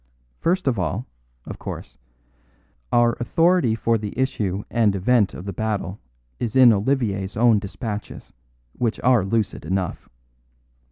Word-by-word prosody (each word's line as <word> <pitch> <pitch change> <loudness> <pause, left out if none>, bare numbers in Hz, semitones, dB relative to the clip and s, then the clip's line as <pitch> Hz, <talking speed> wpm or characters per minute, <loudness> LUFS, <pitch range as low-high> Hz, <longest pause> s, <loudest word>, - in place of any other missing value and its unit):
First 180 -1 0
of 120 -6 +1
all, 100 +6 -2 0.4
of - - -8
course, - - -8 0.9
our 120 0 +4
authority 165 -1 +2
for 115 0 +1
the 105 +1 -6
issue 105 -7 -1
and 110 -4 +2
event 105 +1 +2
of - - -8
the 100 - -4
battle 105 -1 -3 0.4
is 115 -1 -3
in 125 -3 +8
Olivier's 105 -4 -1
own 115 -2 +5
dispatches, 105 +1 -6 0.4
which 115 -2 -1
are 125 -5 +4
lucid 105 +1 -1
enough. 90 +3 -3
110 Hz, 130 wpm, -23 LUFS, 100-125 Hz, 0.9 s, in